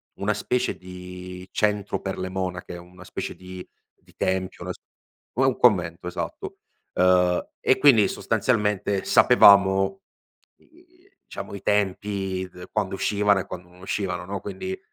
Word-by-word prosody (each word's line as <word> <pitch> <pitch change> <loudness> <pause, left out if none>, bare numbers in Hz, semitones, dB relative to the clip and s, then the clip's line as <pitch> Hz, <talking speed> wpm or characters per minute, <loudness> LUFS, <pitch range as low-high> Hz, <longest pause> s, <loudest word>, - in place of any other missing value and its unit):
una - - 0
specie 125 0 -1
di 90 0 -9
centro 105 -1 0
per 95 -1 -4
le 95 0 -3
monache, 90 -1 -4
una 90 +1 -14
specie - - -5
di 90 0 -10 0.4
di - - -24
tempio, 95 0 -2
las - - -4 0.6
u 130 - +3
ehm, 130 -2 +2
convento, 90 -6 +2
esatto. 90 - -5 0.4
Ehm, 90 -1 +3
e 130 - +3
quindi 130 -7 +6
sostanzialmente 105 -3 0
sapevamo, 95 -1 +6
uhm, 195 - -4 0.7
i 355 +3 -25
diciamo - - -8
i 100 - -8
tempi 95 -2 -1
d 90 0 -11
quando 100 -3 -1
uscivano 100 0 +2
e - - -4
quando 90 0 -9
non 90 +1 -19
uscivano 90 -2 -3
no, 100 0 -5
quindi 185 - -5
95 Hz, 145 wpm, -24 LUFS, 90-105 Hz, 0.7 s, quindi